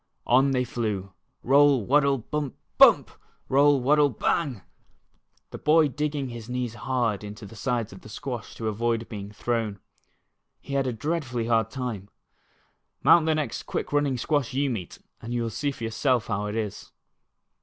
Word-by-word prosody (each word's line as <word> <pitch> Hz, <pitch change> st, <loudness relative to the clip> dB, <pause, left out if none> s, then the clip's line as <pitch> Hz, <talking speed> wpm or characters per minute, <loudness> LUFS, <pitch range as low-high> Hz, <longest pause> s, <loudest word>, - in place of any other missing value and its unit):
On 130 Hz, +3 st, +4 dB
they 130 Hz, -2 st, +1 dB
flew, 105 Hz, -6 st, -3 dB
" -, -, -47 dB
roll, 140 Hz, -3 st, +5 dB
waddle, 140 Hz, +1 st, +3 dB
bump, 140 Hz, +3 st, -4 dB, 0.2 s
biunp; -, -, +7 dB, 0.4 s
roll, 140 Hz, +1 st, +4 dB
waddle, 145 Hz, +3 st, +4 dB
bang,'^ 130 Hz, -, -1 dB, 0.9 s
the -, -, -7 dB
boy 155 Hz, 0 st, +4 dB
digging 145 Hz, -1 st, -2 dB
his 120 Hz, -1 st, -8 dB
knees 125 Hz, -2 st, -2 dB
hard 115 Hz, -3 st, -1 dB
into 105 Hz, +1 st, -8 dB
the 115 Hz, -, -12 dB
sides 120 Hz, -3 st, -2 dB
of 95 Hz, -, -12 dB
the -, -, -13 dB
squash 120 Hz, 0 st, -6 dB
to 110 Hz, -, -4 dB
avoid 115 Hz, +1 st, -1 dB
being 100 Hz, -2 st, -7 dB
thrown. 110 Hz, -2 st, -2 dB, 0.8 s
He 140 Hz, -, -8 dB
had 135 Hz, -1 st, +1 dB
a -, -, 0 dB
dreadfully 130 Hz, -1 st, -2 dB
hard 115 Hz, -1 st, +2 dB
time. 115 Hz, -6 st, -5 dB, 0.9 s
Mount 165 Hz, -2 st, +6 dB
the 160 Hz, -, +3 dB
next 150 Hz, -7 st, -3 dB
quick -, -, -3 dB
running 145 Hz, -3 st, +2 dB
squash 135 Hz, -1 st, -1 dB
you 140 Hz, 0 st, +1 dB
meet, 95 Hz, -8 st, -5 dB, 0.2 s
and 120 Hz, +2 st, -5 dB
you 120 Hz, -, 0 dB
will 115 Hz, -, -3 dB
see 145 Hz, +7 st, -1 dB
for 135 Hz, -4 st, -7 dB
yourself 115 Hz, +1 st, +1 dB
how 105 Hz, +1 st, -2 dB
it 105 Hz, -, -4 dB
is. 110 Hz, -3 st, -4 dB
125 Hz, 170 wpm, -26 LUFS, 110-140 Hz, 0.9 s, biunp